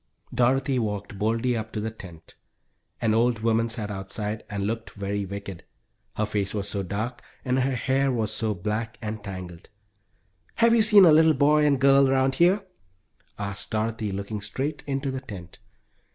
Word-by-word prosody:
Dorothy 130 +2 +2
walked 105 -3 -4
boldly 115 +3 +1
up 110 -1 -4
to 110 - -2
the 110 +1 -3
tent. 85 -7 -12 0.7
An 110 -1 +2
old 115 0 +2
woman 115 0 +2
sat 110 -3 -4
outside 105 +2 -4
and 100 -1 -3
looked 115 +2 -3
very 100 0 -3
wicked, 100 -2 -7 0.5
her 110 - +1
face 105 -1 -2
was 100 -1 -2
so 100 -1 -2
dark 105 +6 -4 0.2
and 130 0 +1
her 130 0 +1
hair 130 -2 +1
so 110 0 -2
black 110 +5 -3
and 110 -2 -5
tangled. 90 -3 -8 0.9
"Have 230 0 +4
you 230 - +5
seen 210 -3 +7
a 165 - +7
little 160 +1 +6
boy 150 +2 +4
and 140 -2 +2
girl 135 0 +5
around 135 0 +2
here?" 180 +7 +3 0.7
asked 100 -1 -5
Dorothy, 110 -1 -2
looking 100 +2 -4
straight 135 +8 -4
into 135 0 -2
the 130 0 -4
tent. 95 -8 -10
110 Hz, 165 wpm, -25 LUFS, 100-130 Hz, 0.9 s, seen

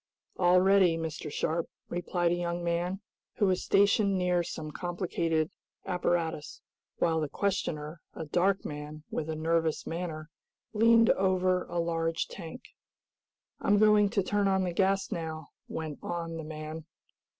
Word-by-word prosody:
"All 180 0 +5
ready, 190 -3 +5
Mr. 160 -2 -4
Sharp," 165 +3 -1 0.2
replied 175 0 0
a - - +2
young 175 0 -2
man, 175 +3 -1 0.3
who 205 - +2
was 185 -2 +1
stationed 200 0 +3
near 180 -1 +2
some 155 -2 -5
complicated 170 -2 -1 0.3
apparatus, 170 -4 -1 0.4
while 165 -1 +2
the 155 -2 -2
questioner, 160 -5 -2
a 160 - -5
dark 185 +6 +1
man, 150 +1 -6
with 160 - -3
a 160 - -2
nervous 160 0 0
manner, 165 -2 -5 0.4
leaned 230 +1 +6
over 185 -1 +2
a - - -5
large 165 -1 0
tank. 190 +7 -9 0.9
"I'm 205 - +3
going 210 -1 +5
to 200 -2 +1
turn 205 +1 +1
on 190 -1 +2
the 180 -2 -2
gas 195 +1 +1
now," 160 -2 -4 0.2
went 155 -2 -5
on 165 -1 -4
the 160 - -5
man. 155 0 -6
170 Hz, 145 wpm, -30 LUFS, 160-190 Hz, 0.9 s, leaned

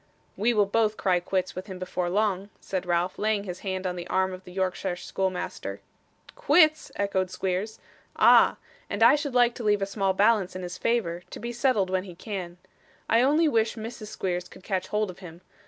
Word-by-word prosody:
'We 230 +4 +1
will 205 -1 +4
both 215 +1 +1
cry 185 -2 +2
quits 185 +1 -2
with 185 +3 -7
him 190 -2 -7
before 180 -1 -3
long,' 200 0 0
said 185 -2 -4
Ralph, 175 +1 0
laying 215 -1 +1
his 180 -2 -6
hand 190 -1 -4
on 180 -1 -1
the 175 -1 -6
arm 190 0 +1
of 185 0 -10
the 180 - -11
Yorkshire 185 0 -2
schoolmaster. 185 0 -3 0.6
'Quits!' 315 -11 +4
echoed 190 -2 0
Squeers. 190 +3 -2 0.4
'Ah! - - +6 0.3
and 205 +3 0
I 235 - +8
should 290 -3 -3
like 245 -1 +5
to 240 - -7
leave 205 -2 +2
a - - +1
small 195 -1 0
balance 200 -2 +2
in 185 - -5
his 180 +1 -6
favour, 185 -8 0
to - - -8
be 235 - -4
settled 230 -7 +1
when 185 0 0
he 180 -3 -10
can. 180 -3 -6 0.5
I 230 - +4
only 300 +5 +4
wish 225 -5 +1
Mrs. 225 -1 -7
Squeers 180 -4 -3
could - - -15
catch 190 -2 -2
hold 210 -2 -1
of 180 - -16
him. 175 -2 -11
195 Hz, 205 wpm, -26 LUFS, 185-220 Hz, 0.6 s, I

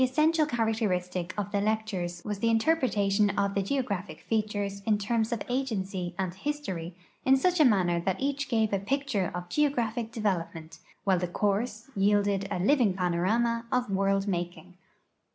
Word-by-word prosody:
ssential 305 +4 +3
characteristic 185 -7 -1
of 205 -1 -3
the 200 -1 +1
lectures 200 -5 -2
was 210 -1 -3
the 230 - +2
interpretation 220 -6 +2
of 200 0 +1
the 200 - +1
geograj)hic 205 -4 -2
features 205 -2 -2
in 215 -1 +4
terms 220 +2 0
of 235 - -2
agency 195 -9 -2
and 185 -2 -2
history 190 - -4 0.3
in 265 0 +5
such 350 +3 +3
manner 185 -9 +3
that 190 +2 -1
each 280 +1 -1
gave 220 -4 +1
a 200 - +2
picture 220 -3 -1
of 180 0 -5
geographic 240 -3 0
develoi)ment, 170 -7 -3 0.2
while 190 -3 +3
the 180 - -1
course 210 +5 -1
}'ielded 200 0 +2
a 205 - -2
living 210 0 +3
panorama 200 +7 +1
of 250 -4 0
world 195 +1 +1
making. 175 -1 -3
205 Hz, 155 wpm, -28 LUFS, 190-235 Hz, 0.3 s, in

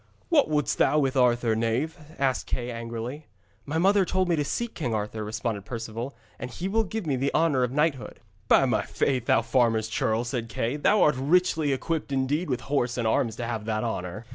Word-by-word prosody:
'What 305 - +4
wouldst 150 -1 0
thou 150 - +4
with 135 -3 +1
Arthur, 120 -3 +3
knave?' 115 +9 0 0.2
asked 135 -2 0
Kay 125 0 -3
angrily. 115 +5 -6 0.4
'My 155 +3 -1
mother 195 +3 +4
told 185 0 0
me 170 - +3
to 150 - 0
seek 235 +10 -3
King 120 -9 -2
Arthur,' 105 +1 -3
responded 110 -1 -3
Perceval,' 115 +3 -5 0.2
and 125 - -5
he 170 +9 -4
will 220 +3 +2
give 215 0 -4
me 145 -4 0
the 135 +2 0
honour 155 -5 +3
of 125 -1 +1
knighthood.' 150 -1 -1 0.3
'By - - +5
my - - +1
faith, 130 -4 -1
thou - - +4
farmer's 115 -2 +2
churl,' 110 +1 0
said 120 -1 -3
Kay, 115 +5 -2
'thou 210 +8 +4
art 150 - +4
richly 160 0 +2
equipped 150 +3 -2
indeed 140 +6 0
with 125 -2 -1
horse 125 -3 -1
and 115 -2 0
arms 110 0 +1
to 120 - -4
have 115 -2 -4
that 110 -1 -1
honour.' 105 -1 -4
130 Hz, 205 wpm, -26 LUFS, 115-150 Hz, 0.4 s, By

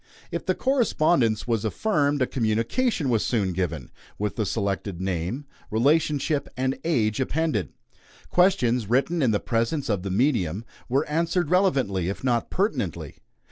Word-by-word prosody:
If - - -4
the - - +2
correspondence 170 - +2
was 115 -3 0
affirmed, 145 - +1
a - - +3
communication 125 - 0
was 115 -4 +2
soon 100 -6 0
given, 85 -7 -3 0.3
with 105 0 -2
the 110 -3 -1
selected 100 -3 -2
name, 95 - -3 0.2
relationship, 145 +4 +1
and 130 +1 -1
age 115 -10 +1
appended. 135 - -1 0.6
Questions, 125 - +3
written 140 +7 +1
in 130 - +3
the 105 -2 +2
presence 115 +5 -1
of 100 -4 0
the 100 - -4
medium, 105 - +1 0.2
were 135 +4 +2
answered 165 +1 0
relevantly, 135 - +2
if 100 - -5
not 120 -3 +1
pertinently. 100 - -2
120 Hz, 140 wpm, -25 LUFS, 100-150 Hz, 0.6 s, a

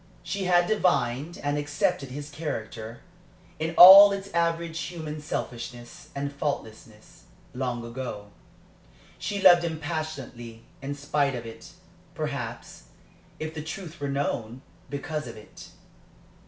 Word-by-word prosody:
She 195 -1 -3
had 175 -1 +4
divined 170 - 0
and 145 0 0
accepted 145 -2 -1
his 145 +3 -7
character, 115 -7 -6 0.6
in 165 +1 -2
all 195 +3 +12
its 195 0 -4
average 170 -1 0
human 155 -4 -5
selfishness 120 -4 -6
and 140 0 -3
faultiness, 110 -7 -6 0.3
long 125 -2 -3
ago. 115 -4 -6 0.9
She 205 - -3
loved 175 -2 +8
him 160 -2 -3
passionately 140 -8 -6 0.2
in 140 +1 -4
spite 145 -1 0
of 120 -1 -6
it 115 0 -11 0.4
perhaps, - - -5 0.5
if 155 0 -5
the 160 - -5
truth 165 +2 -7
were 140 - -2
known, 130 -3 -3 0.3
because 150 0 -4
of 115 - -9
it. 105 - -13
145 Hz, 125 wpm, -26 LUFS, 120-165 Hz, 0.9 s, all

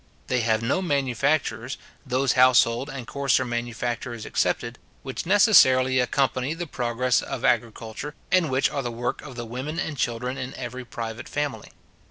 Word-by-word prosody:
They 125 - +2
have 110 0 +1
no 130 +11 +1
manufactures, 135 -5 0 0.3
those 130 0 +1
household 125 0 +4
and 130 -4 -6
coarser 135 -1 +1
manufactures 120 0 -3
excepted, 120 0 -1 0.2
which 130 +4 -5
necessarily 130 - +6
accompany 130 +3 0
the 175 +1 -4
progress 125 -3 0
of - - -4
agriculture, 115 +5 -1 0.2
and 180 -4 +3
which 130 +1 +2
are 140 - -2
the 120 - -3
work 120 +1 -3
of 135 -4 -10
the 120 -1 -5
women 130 +7 -5
and 160 -3 -2
children 125 +1 -2
in 125 +1 -5
every 125 0 -6
private 115 -1 -6
family. 145 -2 -3
125 Hz, 155 wpm, -25 LUFS, 120-140 Hz, 0.3 s, necessarily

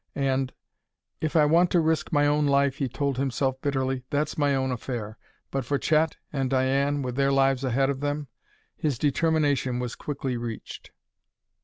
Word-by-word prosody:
And: 135 -1 0 0.7
"If 155 0 -2
I 155 -2 +6
want 170 +4 +4
to 175 - +3
risk 160 -1 0
my 145 -1 +3
own 145 0 +2
life," 140 -1 +2
he 140 -4 0
told 140 0 -2
himself 130 0 -1
bitterly, 130 -2 -1
"that's 150 +1 -1
my 145 -2 +2
own 130 -1 0
affair. 115 -3 -5 0.3
But 135 -1 -1
for 140 +4 0
Chet, 155 +2 +1 0.2
and 135 -2 0
Diane, 135 +2 +1
with 125 -1 -4
their 140 0 +2
lives 135 -1 +2
ahead 135 +2 +2
of 135 - -4
them 145 0 -2 0.2
" - - -35
His 145 -5 -1
determination 145 -3 +1
was 125 -1 -3
quickly 135 -4 -3
reached. 115 -2 -7
140 Hz, 175 wpm, -26 LUFS, 130-145 Hz, 0.7 s, I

